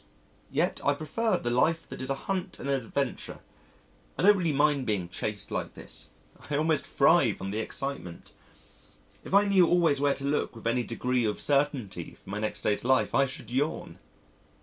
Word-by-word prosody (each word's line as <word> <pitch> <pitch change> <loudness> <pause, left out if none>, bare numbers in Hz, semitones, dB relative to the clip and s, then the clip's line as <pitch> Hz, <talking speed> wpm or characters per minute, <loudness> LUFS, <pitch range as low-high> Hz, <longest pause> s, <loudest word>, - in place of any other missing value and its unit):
Yet - - 0
I 145 - +3
prefer 185 +8 0
the 120 - -2
life 160 +7 +2
that - - -8
is 130 - -4
a 135 - +1
hunt 190 -1 -2
and - - -6
an 140 - +1
adventure. 135 +1 -3 0.8
I - - -1
don't 205 +2 +7
really 175 -5 0
mind 145 -2 +2
being 95 -5 -1
chased 100 +2 -4
like - - -3
this. - - -9 0.4
I 145 - 0
almost 155 +1 +1
thrive - - +4
on 95 0 -4
the 105 - -2
excitement. 110 -7 -5 0.9
If - - -2
I 205 +1 +6
knew 190 -4 +5
always 165 -5 +3
where 145 -1 +3
to 135 - -8
look 140 -3 -1
with 115 - -12
any 120 +2 +1
degree 125 +1 -1
of 105 -1 -1
certainty 135 - 0
for - - -13
my 105 - -3
next 110 0 -2
day's 105 - +1
life 130 +1 +2
I 135 0 +4
should 130 -1 -8
yawn! 145 +5 -2
140 Hz, 190 wpm, -28 LUFS, 115-155 Hz, 0.9 s, don't